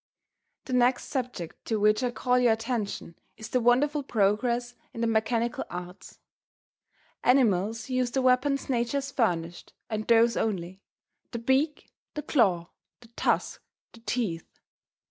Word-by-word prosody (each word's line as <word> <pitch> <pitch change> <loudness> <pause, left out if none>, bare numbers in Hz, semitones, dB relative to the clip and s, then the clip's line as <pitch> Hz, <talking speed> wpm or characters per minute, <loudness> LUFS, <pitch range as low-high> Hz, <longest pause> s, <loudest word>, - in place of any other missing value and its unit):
The 260 - -5
next 250 0 +2
subject 245 - -4
to 220 -2 -1
which 210 +2 +3
I 250 - +1
call 250 +1 +1
your 240 -2 +4
attention 220 -6 -4 0.2
is 220 - -8
the 255 - +1
wonderful 270 +5 +3
progress 240 +1 0 0.2
in 230 - -4
the - - +2
mechanical 225 +1 0
arts. 180 +1 -8 1.1
Animals 225 -4 +2
use 255 -1 0
the 265 +1 -1
weapons 260 +2 +2
nature 240 +1 0
has 275 0 -3
furnished, 175 -9 -1 0.2
and 215 0 -3
those 230 0 +5
only 190 -3 -2 0.5
the 235 - -5
beak, 265 +6 0 0.2
the 300 - -4
claw, 190 - +2 0.3
the 235 - -17
tusk, 235 - -1 0.3
the 230 - -14
teeth. 225 -8 -3
235 Hz, 140 wpm, -27 LUFS, 215-255 Hz, 1.1 s, those